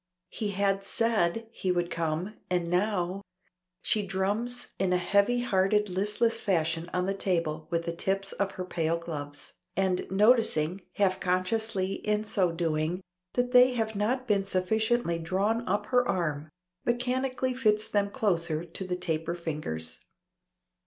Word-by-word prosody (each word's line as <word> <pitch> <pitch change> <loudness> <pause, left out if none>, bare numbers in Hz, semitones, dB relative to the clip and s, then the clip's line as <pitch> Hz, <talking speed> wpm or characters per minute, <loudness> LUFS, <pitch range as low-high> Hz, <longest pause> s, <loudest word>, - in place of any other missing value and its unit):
He 215 -3 -3
had 195 0 +1
said 225 -1 +1
he 185 -5 -1
would 175 -1 0
come, 165 +4 -2 0.2
and 175 -2 0
now 185 0 0 0.6
She 215 - +1
drums 205 +6 -2
in 190 -1 +1
a - - +4
heavy 200 +6 +2
hearted 210 -1 +2
listless 210 +5 +1
fashion 165 -3 0
on 180 0 0
the 195 - 0
table 165 -5 -1
with 170 0 -1
the 170 0 -3
tips 195 +2 -1
of 200 -1 -2
her 185 - -5
pale 165 -2 0
gloves, 145 -4 -7 0.2
and 190 -1 +1
noticing, 195 -5 +3
half 190 -2 +2
consciously 190 +1 0
in 210 0 +1
so 190 -4 +1
doing, 165 +1 -1 0.3
that 245 0 0
they 250 0 +7
have 220 -2 -1
not 250 +5 0
been 200 -3 +2
sufficiently 195 0 +1
drawn 200 +8 0
up 205 +3 0
her 250 0 +6
arm, 155 -4 -1 0.3
mechanically 255 +2 0
fits 215 -4 +2
them 200 -1 +1
closer 170 -8 0
to 190 - -5
the 180 -1 -2
taper 165 -1 -2
fingers. 150 - -4
190 Hz, 145 wpm, -29 LUFS, 170-215 Hz, 0.6 s, they